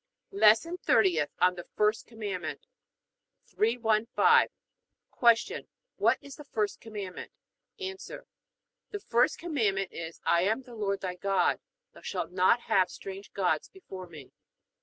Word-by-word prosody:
LESSON 335 - +4
THIRTIETH 175 - +3
ON 180 0 +5
THE 175 -1 -9
FIRST 210 +1 +1
COMMANDMENT 205 -6 -5 0.8
315. 230 - +3 1.0
Q. - - -7 0.3
What - - +3
is 280 -1 -11
the 295 - -10
first 215 -7 -2
Commandment? 205 -5 -7 0.5
A. 380 -1 -3 1.0
The 415 - -5
first 240 -8 +2
Commandment 215 - -1
is: 165 0 -7
I 170 - +4
am 220 +8 0
the 245 -1 -13
Lord 200 -3 -2
thy 185 -2 -3
God: 195 +2 +1 0.3
thou - - -15
shalt - - -4
not 185 +6 +3
have 190 -6 +2
strange 195 +2 -9
gods 180 -6 0
before 190 - -10
Me. 150 -6 -12
210 Hz, 130 wpm, -29 LUFS, 185-240 Hz, 1.0 s, ON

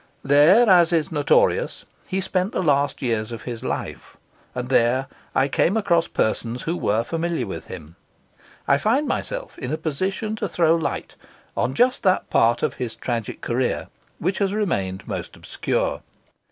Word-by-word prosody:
There, 150 - +6
as 175 -4 +6
is 165 -2 +1
notorious, 145 -3 +2 0.2
he 190 +1 -1
spent 185 +1 -1
the - - 0
last 145 -2 +1
years 115 -2 -1
of 115 - -7
his 120 -2 -6
life; - - -5 0.4
and 125 0 -4
there 130 +1 +3 0.3
I 135 - +3
came 175 +8 +2
across 170 -6 +2
persons 115 +2 -1
who 170 - -1
were 110 -7 +1
familiar 165 -1 -2
with 95 - -6
him. 85 -2 -10 0.7
I 140 - +4
find 255 - +1
myself - - -4
in - - -4
a 155 - -1
position 190 +8 -2
to 210 -2 -2
throw 165 -2 +3
light 165 -3 -2 0.4
on 130 - -1
just 250 +1 +3
that 185 -2 +1
part 120 +1 +3
of - - +1
his 120 -2 -3
tragic 115 -3 -4
career 125 +1 -1 0.3
which 190 - -1
has 200 0 0
remained 95 - -2
most - - -5
obscure. - - -2
155 Hz, 165 wpm, -23 LUFS, 120-185 Hz, 0.7 s, There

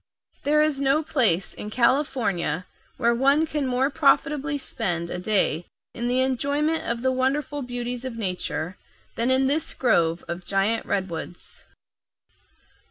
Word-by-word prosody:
There 300 +1 +4
is 300 -3 0
no 280 +3 +3
place 225 - +1
in 210 - -7
California 235 - +1 0.3
where 235 -2 +3
one 275 +6 +3
can 300 -3 -2
more 255 +3 +1
profitably 290 0 +2
spend 175 -11 -3
a 180 - -3
day 180 -4 +1 0.3
in 240 0 -3
the 250 +1 +2
enjoyment 285 +5 +1
of 235 +1 -2
the 260 - +3
wonderful 275 +3 -1
beauties 245 -1 -4
of 255 -3 -5
nature 180 -3 -3 0.3
than 235 +2 0
in 260 +1 +4
this 290 +3 0
grove 170 -9 +2
of 170 +1 -5
giant 200 +4 0
redwoods. 180 -2 -4
250 Hz, 140 wpm, -25 LUFS, 195-280 Hz, 0.3 s, There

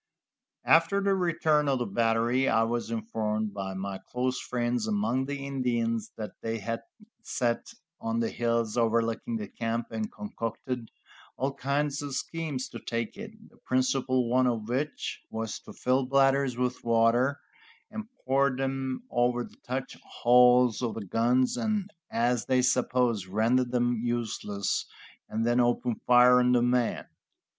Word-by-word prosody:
After 165 +5 +4
the 200 0 +2
return 165 -5 +2
of 135 - +2
the 120 - -1
battery 115 +4 +1
I 115 - +3
was 115 0 -2
informed 110 -2 -2
by 95 -1 -4
my 95 0 -4
close 125 +1 -1
friends 120 -2 -1
among 110 +5 0
the 140 -1 -4
Indians 120 -5 -1
that 110 -2 -5
they 115 0 -2
had 115 +2 -4 0.4
sat 120 -2 -1 0.3
on 115 0 -2
the 115 - 0
hills 115 -1 0
overlooking 115 - +1
the 210 -1 -5
camp 115 0 -3
and 215 -1 -3
concocted 125 - -5 0.5
all 135 +2 -1
kinds 140 +1 -1
of 140 -2 -4
schemes 155 -4 -3
to - - -8
take 115 -1 -3
it, 215 +1 -7 0.2
the - - -23
principal 130 -1 +1
one 130 +2 +3
of 115 -3 -1
which 135 +5 -3
was 110 -1 -4
to - - -12
fill 130 +1 +1
bladders 135 -1 +3
with 125 0 -1
water, 120 +4 +3 0.5
and 220 0 -5 0.2
pour 135 +1 +3
them 135 - -2
over 120 0 +1
the - - -13
touch 130 +2 -5 0.3
holes 125 -1 +6
of 120 -3 -2
the 110 - -5
guns, 120 +6 +2
and, 210 -2 -1 0.2
as 120 -1 0
they 130 -1 +3
supposed, 125 -5 +1
render 115 +6 +2
them 120 -1 0
useless, 110 -4 -2 0.4
and 110 +1 -1
then 120 +1 +2
open 120 0 +2
fire 125 0 +7
on 125 0 +3
the 120 -1 +4
men. 125 -1 +1
125 Hz, 150 wpm, -28 LUFS, 115-135 Hz, 0.5 s, fire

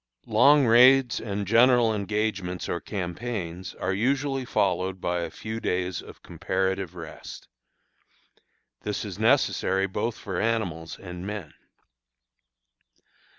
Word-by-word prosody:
Long 145 -1 +5
raids 125 +2 +6
and 100 -2 -3
general 115 +2 +5
engagements 100 -3 -2
or 85 - -2
campaigns 95 -2 -5
are 95 - -2
usually 135 +5 0
followed 95 -4 0
by 90 0 -1
a 85 - -3
few 110 +1 -6
days 90 -4 -2
of - - -14
comparative 95 -2 -2
rest. 80 -2 -9 1.3
This - - -3
is - - -7
necessary 95 0 +2
both 105 +4 -3
for 95 -4 -4
animals 90 -8 -2
and 90 -2 -8
men. 105 -7 -6
100 Hz, 110 wpm, -26 LUFS, 90-115 Hz, 1.3 s, raids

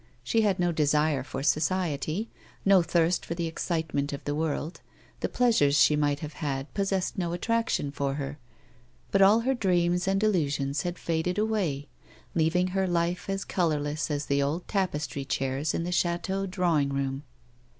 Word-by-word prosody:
She 225 - +2
had 200 -3 +2
no 175 -1 +2
desire 150 -2 +2
for 135 +1 -5
society, 155 +5 0 0.3
no 195 -2 +6
thirst 170 +1 +1
for 170 - -4
the 170 -1 -2
excitement 160 -3 -2
of 140 - -6
the 145 - -2
world, 155 +1 -2 0.4
the - - -2
pleasures 150 -13 +3
she 150 - +6
might 145 -1 +1
have 155 -1 -6
had 140 -2 -3
possessed 195 -1 -1
no 170 -2 -1
attraction 225 -5 0
for 140 -1 -2
her, 145 +1 -5 0.7
but 195 - +3
all 205 +4 +6
her 265 +3 +1
dreams 180 -5 +1
and 195 +2 +1
illusions 145 -8 +1
had 175 -1 -3
faded 170 +3 -1
away, 195 -10 0 0.5
leaving 175 +3 +2
her 190 0 0
life 175 +1 -1
as 195 0 -2
colourless 155 -3 -1
as 145 0 -2
the 140 0 +1
old 150 +5 -2
tapestry 155 -8 -1
chairs 135 +2 -1
in - - -1
the 175 - -3
chateau 180 +3 0
drawing 175 -7 +1
room. 135 0 -2
165 Hz, 165 wpm, -28 LUFS, 145-185 Hz, 0.7 s, no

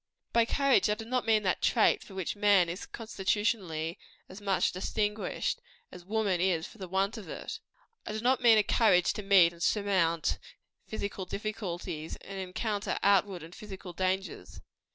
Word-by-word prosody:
By 235 -1 +4
courage 275 -1 +3
I 210 - +2
do 225 +1 -8
not 250 0 -1
mean 215 -1 +4
that 185 -2 0
trait 225 - +3
for 195 - -13
which 190 0 -3
man 205 -4 +4
is 180 +3 -6
constitutionally 195 -6 -2 0.3
as 190 +3 -11
much 195 -2 +1
distinguished, 210 - -2 0.3
as 180 - -11
woman 200 -2 0
is 175 -3 +1
for 225 - -13
the 190 - -6
want 195 +5 0
of 205 - -11
it - - -6 0.5
I - - -3
mean 220 +1 -4
not 255 +1 +2
a 225 -3 +7
courage 195 -5 +3
to 210 - -5
meet 190 -4 +5
and 170 - -15
surmount 185 -5 +1 0.5
physical 200 -3 -4
difficulties, 180 -6 -5
and 195 0 -7
encounter 200 +3 -2
outward 195 -3 +3
and 165 +2 -11
physical 190 -3 -9
dangers. 185 - -3
195 Hz, 165 wpm, -30 LUFS, 180-215 Hz, 0.5 s, a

